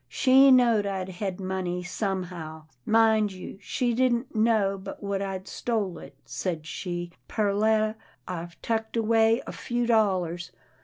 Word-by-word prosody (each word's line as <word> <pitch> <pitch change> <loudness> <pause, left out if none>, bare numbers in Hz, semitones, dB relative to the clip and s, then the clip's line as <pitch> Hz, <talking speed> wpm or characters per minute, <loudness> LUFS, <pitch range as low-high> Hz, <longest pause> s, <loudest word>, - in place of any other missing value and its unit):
She 270 0 +6
knowed 235 -5 +5
I'd 190 -1 -3
hed 190 0 -4
money, 185 -1 -3
some 190 +1 -2
how. 160 -3 -8 0.2
Mind 220 -1 +4
you, 190 +1 -9
she 245 -2 -1
didn't 245 0 +1
know 215 -3 +3
but 190 - -9
what 200 -1 -2
I'd 190 -1 -4
stole 215 -7 -2
it. - - -12
Said 165 -5 -4
she, 175 0 -5
' - - -43
Perletta, 215 +1 +2 0.3
I've 170 -1 -6
tucked 225 0 -1
away 225 +1 +3
a - - -6
few 240 0 -2
dollars. 185 -7 +1
200 Hz, 150 wpm, -27 LUFS, 185-225 Hz, 0.3 s, She